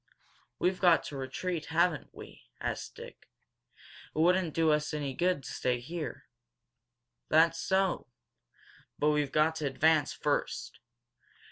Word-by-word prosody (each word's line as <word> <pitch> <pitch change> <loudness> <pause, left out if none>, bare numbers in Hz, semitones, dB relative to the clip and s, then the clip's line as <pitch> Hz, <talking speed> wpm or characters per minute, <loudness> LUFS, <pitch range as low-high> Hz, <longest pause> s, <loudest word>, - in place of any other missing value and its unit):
"We've 185 0 0
got 175 -3 +5
to 145 - -7
retreat, 155 +5 -3
haven't 170 0 +1
we?" - - -13
asked - - -4
Dick. - - -12 0.9
"It - - -8
wouldn't 175 0 +3
do 160 -1 +3
us 150 0 0
any 140 -3 -3
good 175 -2 0
to - - -7
stay 125 -1 0
here." 160 +6 -6 1.0
"That's 165 +1 +4
so. 190 -5 0 0.9
But 150 +1 +3
we've 150 -2 0
got 160 +1 +2
to 150 - -1
advance 155 +2 +3
first. 130 -4 -2
155 Hz, 130 wpm, -30 LUFS, 145-175 Hz, 1.0 s, got